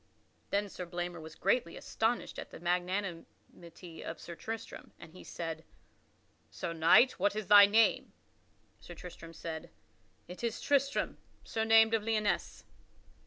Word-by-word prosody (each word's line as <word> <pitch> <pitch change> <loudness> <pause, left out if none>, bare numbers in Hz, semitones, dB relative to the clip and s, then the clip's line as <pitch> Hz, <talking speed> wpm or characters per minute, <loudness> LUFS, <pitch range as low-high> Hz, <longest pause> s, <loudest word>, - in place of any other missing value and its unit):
Then 205 +1 0
Sir 180 -2 -8
Blamor 175 -1 -5
was 160 0 -10
greatly 195 -2 0
astonished 225 +2 -2
at - - -7
the - - -11
magnanimity 175 -1 -5
of 165 - -6
Sir 170 - -8
Tristram, 225 +6 -7
and 165 -2 -13
he 185 - -12
said, 165 -1 -6 0.9
"Sir 170 - -5
Knight, 165 +10 +5
what 205 - +1
is 215 -1 -3
thy 205 +1 +9
name?" 220 +2 +3 0.7
Sir 175 - -11
Tristram 165 -1 -10
said, 160 -1 -6 0.6
"It 180 +6 -10
is 230 -1 -2
Tristram, 280 -1 0 0.2
surnamed 225 0 +4
of 225 - +2
Lyonesse." 215 -1 -1
185 Hz, 135 wpm, -32 LUFS, 170-220 Hz, 0.9 s, thy